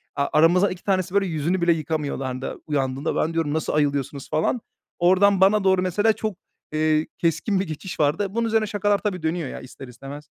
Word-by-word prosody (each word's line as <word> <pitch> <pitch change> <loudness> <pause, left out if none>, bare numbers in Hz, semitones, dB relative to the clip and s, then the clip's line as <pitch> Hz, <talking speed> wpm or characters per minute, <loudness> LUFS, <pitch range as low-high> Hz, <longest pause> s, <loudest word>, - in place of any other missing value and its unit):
a 140 0 0
aramızdan 175 +5 +4
2 180 -1 -8
tanesi, 185 -2 0
böyle, 200 -1 +3
yüzünü 170 +2 -1
bile 170 -1 +4
yıkamıyorlardı 140 -4 -3
uyandığında. 135 0 -1
Ben 160 - 0
diyorum, 160 -3 -1
“Nasıl 160 - -1
ayılıyorsunuz?” 140 -2 -1
falan. 190 +10 0 0.4
Oradan 190 +2 +4
bana 200 +2 +5
doğru 190 -1 +3
mesela 205 +5 +2
çok, 215 -3 -4 0.3
eee, 155 0 +1
keskin 170 +4 0
bir 190 - -2
geçiş 160 +3 -7
vardı. 150 +8 +2
Bunun 230 0 +1
üzerine 220 -1 +1
şakalar, 205 0 +1
tabii, 185 -6 -3
dönüyor 160 -3 -1
ya - - -7
ister 130 +1 -11
istemez. 135 +4 -10
165 Hz, 185 wpm, -23 LUFS, 150-195 Hz, 0.4 s, bana